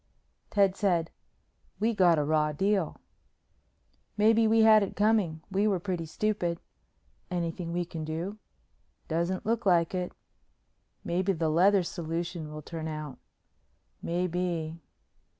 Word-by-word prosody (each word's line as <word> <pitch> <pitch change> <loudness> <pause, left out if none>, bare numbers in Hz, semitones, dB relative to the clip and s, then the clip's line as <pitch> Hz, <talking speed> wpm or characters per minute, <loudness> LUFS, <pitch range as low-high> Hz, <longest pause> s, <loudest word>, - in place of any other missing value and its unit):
Ted 195 -2 +3
said, 175 -5 +1 0.7
"We 225 +3 +1
got 180 -5 +4
a 150 - +2
raw 150 0 +1
deal." 195 +1 0 1.2
"Maybe 220 +1 +4
we 225 +1 +4
had 220 -1 +7
it 200 - -3
coming. 205 -7 +2
We 200 +2 +2
were 195 -3 +1
pretty 175 -3 -3
stupid." 175 -2 -1 0.7
"Anything 170 -1 -3
we 175 +1 -1
can 165 -2 -6
do?" 170 +7 -4 0.7
"Doesn't 170 +3 -1
look 230 +2 0
like 175 -3 +3
it." 180 -1 -2 0.9
"Maybe 185 +3 0
the 160 -2 0
leather 185 +4 +4
solution 170 -1 -4
will 155 0 -8
turn 160 0 -6
out." 155 -3 -6 0.8
"Maybe." 170 -2 -2
175 Hz, 125 wpm, -29 LUFS, 165-200 Hz, 1.2 s, had